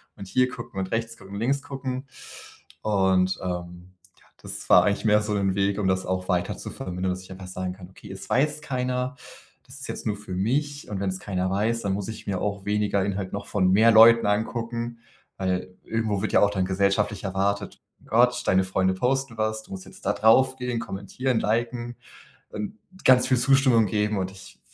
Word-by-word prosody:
und 100 - -9
hier 130 +6 +2
gucken 120 -5 -7
und 95 0 -3
rechts 115 0 -2
gucken 95 +1 -13
und 100 - -4
links 135 +5 0
gucken. 135 -1 -5 0.8
Und, 95 -3 +2
ähm, 90 0 -6 0.3
ja, - - -26 0.2
das - - -7
war 90 - +8
eigentlich 100 +3 0
mehr 105 0 +4
so 105 0 -2
'n 95 -1 +1
Weg, 100 0 +1
um 95 - 0
das 95 0 +1
auch 95 0 -2
weiter 90 -1 0
zu - - -7
vermindern, 90 +1 -3
dass 95 0 -8
ich 95 - -14
einfach 95 0 -9
sagen 95 0 -4
kann: 95 -1 -12
„Okay, 95 0 -13
es 95 - -9
weiß 150 +3 +1
keiner. 125 -1 -2 0.5
Das 135 +2 -12
ist - - -7
jetzt - - -5
nur 105 - 0
für 105 -2 -8
mich 145 +9 -1
und 100 -2 -4
wenn 100 - 0
es 95 - -3
keiner 95 -2 -2
weiß, 110 +4 0
dann 100 - -1
muss 100 +1 -2
ich 110 - -7
mir 95 -3 -2
auch 100 -1 -3
weniger 105 -1 +1
Inhalt 100 -1 -3
noch 100 0 -5
von 95 -3 +2
mehr 110 +4 +6
Leuten 115 +1 +8
angucken.“ 115 +3 -2 0.4
Weil 95 -1 -2
irgendwo 110 -3 -1
wird 110 - -2
ja - - +6
auch 100 - +5
dann 95 -2 0
gesellschaftlich 100 +2 0
erwartet. 100 +1 -1 0.2
Gott, 125 0 +3
deine 95 0 +4
Freunde 95 0 +1
posten 125 +3 -1
was, 110 0 -1
du - - -18
musst 95 -1 -6
jetzt - - -15
da - - +2
drauf 130 +4 +4
gehen, 125 -2 -2
kommentieren, 115 +5 -2
liken 120 +2 -1 0.5
und 105 - -6 0.3
ganz 130 -1 +6
viel 130 -1 +3
Zustimmung 130 -3 +4
geben 105 +1 0
und 95 0 -2
ich 95 -1 -14
105 Hz, 205 wpm, -25 LUFS, 95-120 Hz, 0.8 s, war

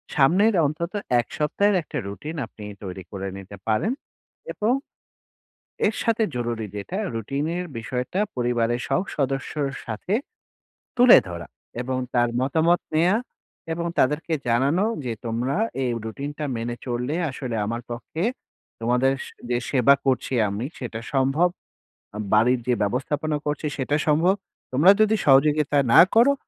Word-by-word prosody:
সামনের 185 +11 +4
অন্তত 160 +4 -2 0.3
এক 120 - -1
সপ্তাহের 200 +7 +2
একটা 150 - -6
রুটিন 145 +11 -6
আপনি 105 - -13 0.2
তৈরি 95 -1 -6
করে 100 -1 -4
নিতে 100 +1 -10
পারেন 110 - +1 0.6
এবং 220 +4 +1 1.1
এর 215 - +1
সাথে 230 -1 +1
জরুরি 120 -2 -2
যেটা 105 - -5 0.2
রুটিনের 145 - -2
বিষয়টা 125 - -3 0.2
পরিবারের 120 -1 +1
সব 185 - +2
সদস্যের 135 +1 -1
সাথে 115 - -3 0.8
তুলে 245 -1 +9
ধরা 85 -1 -7 0.3
এবং 130 +1 -2 0.2
তার 120 -1 +3
মতামত 160 +6 +2
নেয়া 175 +6 +4 0.6
এবং 170 +1 -2
তাদেরকে 150 +5 +2
জানানো 135 - +2 0.2
যে 120 - -2
তোমরা 120 +4 -1 0.3
এই 125 - 0
রুটিনটা 145 +6 -5
মেনে 120 +1 -3
চললে 125 +3 -2 0.2
আসলে 130 -3 -4
আমার 115 +2 -3
পক্ষে 120 +7 -5 0.6
তোমাদের 125 +3 +2
স - - -9 0.2
যে 120 - +2
সেবা 140 0 +5
করছি 130 0 +1
আমি 100 +5 -3
সেটা 115 -3 -5
সম্ভব, 135 +6 +3 0.9
বাড়ির 120 +4 +4
যে 125 - +4
ব্যবস্থাপনা 145 +8 -1
করছি 150 +1 -2
সেটা 140 +2 0
সম্ভব। 160 +5 +4 0.4
তোমরা 150 +9 +6
যদি 215 0 +4
সহযোগিতা 145 +1 +4
না - - +10
করো, 240 +5 +6
135 Hz, 135 wpm, -24 LUFS, 120-160 Hz, 1.1 s, না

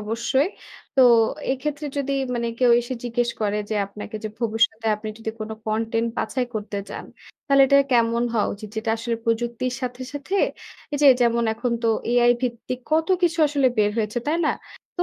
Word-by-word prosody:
অবশ্যই। 235 +6 0 0.5
তো 270 - +4 0.5
এক্ষেত্রে, 290 +3 -3
যদি 280 -1 -1 0.2
মানে 235 -1 -1
কেউ 250 -2 +4
এসে 240 +2 -5
জিজ্ঞেস 240 0 0
করে 210 -1 0
যে - - 0
আপনাকে 210 +2 -8
যে, - - -1
ভবিষ্যতে 225 -1 +1
আপনি 215 +1 -7
যদি 225 0 -4
কোন 215 0 -5 0.2
কনটেন্ট 225 +1 0
বাছাই 250 +3 -1
করতে 210 -1 -4
চান, - - -7 0.4
তাহলে 275 -1 +5
এটা 280 - +5 0.2
কেমন 235 -1 +3
হওয়া 220 -3 +1
উচিত? 210 +1 -9
যেটা 220 +1 -1
আসলে, 230 +1 -2
প্রযুক্তির 235 +2 -1
সাথে, 250 0 -4
সাথে, 290 +6 -5 0.6
এই - - 0
যে - - +7 0.2
যেমন, 235 0 +2
এখন 235 +2 -2
তো - - +1 0.2
এআই 240 0 +5
ভিত্তিক 250 0 -3
কত 320 +2 +2
কিছু 340 -1 +2
আসলে 280 -2 +2
বের 210 -1 +4
হয়েছে, 215 +1 -1
তাই 305 +2 +1
না? 305 - +3 0.5
তো, 355 - +1
235 Hz, 180 wpm, -23 LUFS, 225-260 Hz, 0.6 s, যে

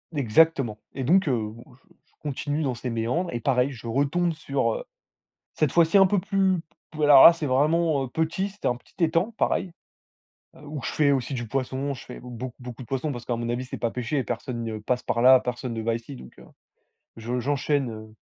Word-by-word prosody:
Exactement. 135 -3 +2
Et 135 - -4
donc, 180 +7 +3
heu, 130 - +2
bon, 115 +2 -12
je - - -29 0.2
je - - -35 0.2
continue 145 +3 -2
dans 130 -4 -1
ces 125 +2 -5
méandres. 120 +10 -1
Et 120 - -2
pareil, 130 +2 +1
je 115 -2 -9
retombe 145 +8 +1
sur, 140 -7 -1
heu, - - -5 0.7
cette 150 -4 +1
fois-ci 170 +3 +4
un 190 - +7
peu 200 +1 +1
plus, 190 -2 +1 0.3
p 155 - -5
alors 145 -2 +8
là, 170 - +11
c'est 165 -3 -4
vraiment, 150 +2 +2
heu, 130 - -6
petit. 165 +7 -1
C'était 205 - -3
un 125 - 0
petit 120 - -22
étang, 165 +7 +2
pareil. 180 -3 0 0.8
Heu, - - -16
où 145 -2 -6
je - - -2
fais 145 -2 +3
aussi 135 0 -1
du 120 -3 -4
poisson. 135 +2 -2
Je 125 - -10
fais 125 - -9
beau 125 0 -7
beaucoup 125 0 -9
de - - -14
poissons 135 +4 -2
parce 120 -2 -7
qu'à 120 - -1
mon 120 0 -4
avis, 120 +2 -2
c'est 125 - -7
pas 115 - -1
péché. 125 +2 -2
Personne 120 0 -4
ne 110 -1 -4
passe 125 +4 -2
par 115 - -1
là. 130 +1 +8
Personne 125 -1 -4
ne 115 - -4
va 115 +1 0
ici, 120 +4 -8
donc, - - -12
heu, - - -14 0.7
je 120 +3 -3
j'enchaîne, 140 +1 0
heu 110 0 -10
130 Hz, 225 wpm, -25 LUFS, 120-155 Hz, 0.8 s, là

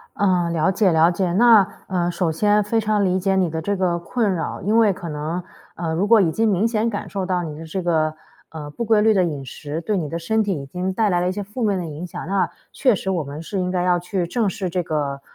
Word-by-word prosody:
嗯， 180 -4 +1
了 165 +3 +2
解 195 0 +2
了 160 +2 +5
解， 180 0 -1
那， 220 -2 +6 0.2
呃， 175 -2 0
首 170 -1 -1
先 210 +4 +3
非 225 +3 0
常 210 -1 +1
理 185 0 +1
解 190 +1 +1
你 185 -2 +2
的 160 0 -4
这 200 +4 -1
个 180 -2 0
困 200 +3 -1
扰， 165 - -4
因 210 +3 +1
为 220 -3 +5
可 180 -2 -7
能， 155 +4 -3 0.3
呃 165 -1 -2
如 180 +5 +1
果 225 0 +6
已 175 -4 +3
经 225 +4 +1
明 200 +1 +2
显 225 0 0
感 205 - -5
受 195 -2 -3
到 180 -1 -1
你 155 -2 -6
的 160 - -8
这 165 +4 -4
个， 160 -3 +1 0.4
呃， 155 -2 -7
不 190 +11 -4
规 220 -1 +3
律 220 +1 +4
的 190 - +3
饮 145 -5 -3
食 150 +4 -6
对 210 +4 -1
你 165 -5 -2
的 165 +3 -4
身 220 +7 +1
体 195 -8 -2
已 140 - -8
经 180 +6 -3
带 215 +3 +1
来 175 -3 +1
了 180 - 0
一 - - -1
些 205 +2 -4
负 210 +5 -6
面 205 -3 +1
的 175 - -4
影 155 +2 -7
响， 170 - -7
那 195 +2 0 0.2
确 255 -4 +3
实 190 - -4
我 175 -4 0
们 145 +2 -7
是 190 +3 -3
应 180 - -1
该 180 -1 0
要 180 -1 +3
去 180 0 -2
正 215 +2 0
视 185 0 -4
这 180 +1 -1
个 145 -4 -2
185 Hz, 295 characters per minute, -21 LUFS, 165-205 Hz, 0.4 s, 那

